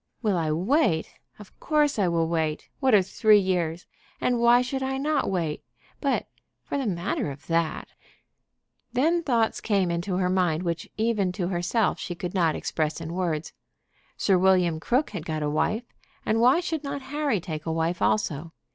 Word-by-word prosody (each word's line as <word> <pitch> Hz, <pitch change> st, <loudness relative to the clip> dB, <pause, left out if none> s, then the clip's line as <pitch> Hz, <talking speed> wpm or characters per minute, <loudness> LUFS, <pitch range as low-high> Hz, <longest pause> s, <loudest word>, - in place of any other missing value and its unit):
Will 210 Hz, -4 st, +2 dB
I 165 Hz, -3 st, 0 dB
wait? 185 Hz, -, +1 dB, 0.2 s
Of 210 Hz, -2 st, -15 dB
course 300 Hz, -5 st, +1 dB
I 195 Hz, -, +3 dB
will 165 Hz, -1 st, +1 dB
wait. 160 Hz, -2 st, -2 dB
What 260 Hz, -5 st, +4 dB
are 195 Hz, -, +5 dB
three 215 Hz, +3 st, +4 dB
years? 175 Hz, -4 st, 0 dB, 0.3 s
And 245 Hz, -1 st, +1 dB
why 240 Hz, +1 st, +5 dB
should 265 Hz, +1 st, -3 dB
I 265 Hz, 0 st, -1 dB
not 290 Hz, +1 st, 0 dB
wait? 170 Hz, -5 st, -2 dB, 0.4 s
But, -, -, 0 dB, 0.4 s
for -, -, -5 dB
the 265 Hz, -, -2 dB
matter 175 Hz, -4 st, -1 dB
of 140 Hz, +1 st, -9 dB
that 165 Hz, -1 st, -1 dB, 0.6 s
" -, -, -50 dB
Then 320 Hz, +7 st, +2 dB
thoughts 235 Hz, -8 st, +1 dB
came 195 Hz, -5 st, +1 dB
into 175 Hz, +2 st, -2 dB
her 185 Hz, -1 st, +1 dB
mind 180 Hz, -3 st, +1 dB
which 170 Hz, -2 st, -3 dB
even 215 Hz, -4 st, +1 dB
to 180 Hz, -1 st, -2 dB
herself 185 Hz, +4 st, 0 dB
she 175 Hz, -, -5 dB
could 175 Hz, 0 st, -5 dB
not 170 Hz, -5 st, +2 dB
express 155 Hz, 0 st, -2 dB
in 165 Hz, 0 st, -6 dB
words. 170 Hz, -4 st, -2 dB, 0.6 s
Sir 190 Hz, -3 st, +3 dB
William 180 Hz, -3 st, +3 dB
Crook 250 Hz, -, 0 dB
had 155 Hz, -, -5 dB
got 155 Hz, -2 st, -3 dB
a 150 Hz, -, 0 dB
wife, 215 Hz, +9 st, 0 dB, 0.4 s
and 225 Hz, +1 st, +1 dB
why 255 Hz, +8 st, +5 dB
should 325 Hz, -3 st, -3 dB
not 280 Hz, -1 st, -4 dB
Harry 290 Hz, -8 st, +1 dB
take 160 Hz, -3 st, -6 dB
a -, -, 0 dB
wife 165 Hz, +2 st, -1 dB
also? 165 Hz, -5 st, 0 dB
185 Hz, 180 wpm, -26 LUFS, 165-235 Hz, 0.6 s, are